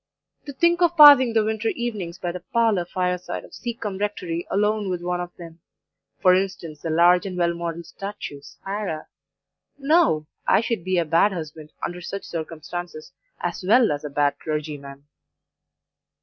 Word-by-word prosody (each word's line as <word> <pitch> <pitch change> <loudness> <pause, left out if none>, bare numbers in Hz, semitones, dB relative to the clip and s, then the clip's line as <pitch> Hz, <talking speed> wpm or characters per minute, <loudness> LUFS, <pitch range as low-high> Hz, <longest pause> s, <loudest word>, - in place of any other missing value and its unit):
To 285 - -6
think 340 +4 +2
of 345 0 +3
passing 285 -5 +9
the 220 -1 +3
winter 220 0 -1
evenings 210 -8 -3
by 175 -2 -3
the 180 - -6
parlour 215 -1 +1
fire 180 0 -1
side 180 - -6
of - - -18
Seacombe 225 -5 -5
Rectory 180 -5 -3
alone 210 0 +1
with 180 -1 -3
one 180 0 -1
of 175 - -5
them 165 -1 -11 0.6
for 185 - +7
instance, 180 -5 -2
the 165 - -4
large 175 +4 +4
and 185 -2 -6
well 170 -1 +2
modelled 170 0 -5
statue, 195 -8 -7
Sarah 195 -1 -6 0.7
no; 285 - +3 0.2
I - - +5
should 230 -6 -2
be 185 0 0
a 170 - +2
bad 165 +6 +3
husband, 155 -3 -7
under 175 +1 -6
such 195 +3 -6
circumstances, 165 0 -6 0.3
as - - -3
well 225 +3 +4
as 145 0 -3
a 150 - -4
bad 145 0 0
clergyman. 145 -3 -5
180 Hz, 165 wpm, -23 LUFS, 165-215 Hz, 0.7 s, passing